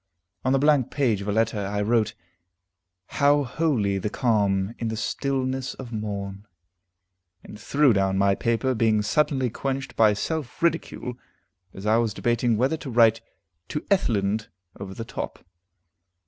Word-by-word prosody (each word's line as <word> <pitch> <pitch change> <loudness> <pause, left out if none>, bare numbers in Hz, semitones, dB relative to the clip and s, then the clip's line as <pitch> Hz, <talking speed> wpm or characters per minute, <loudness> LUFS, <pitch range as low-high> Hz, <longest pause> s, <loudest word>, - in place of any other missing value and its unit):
On 130 - +1
the 135 - +4
blank 145 -2 +3
page 120 -8 +1
of 100 - -6
a - - +1
letter, 110 0 +1
I 100 +1 -2
wrote: 110 0 +1 0.9
"How 145 +1 +3
holy 120 -8 0
the 105 - -2
calm, 105 -4 +1
in 115 - -2
the 110 0 -3
stillness 130 +2 -2
of 125 -3 -9
morn," 100 -2 -5 1.0
and 105 - -11
threw 140 -3 +3
down 95 -1 +1
my 100 0 +3
paper, 115 +5 0
being 110 -2 +2
suddenly 130 0 +1
quenched 135 +2 -4
by 110 -2 +5
self 155 +7 -4
ridicule, 145 -7 -1 0.5
as 95 +2 -10
I 110 +1 +4
was 115 -3 0
debating 120 -1 +1
whether 130 +7 +1
to 150 - -8
write 115 -2 +4 0.5
"To 150 - -3
Ethelind" 110 - +1 0.3
over 95 -1 -7
the 115 - -6
top. - - -6
115 Hz, 150 wpm, -25 LUFS, 105-130 Hz, 1.0 s, by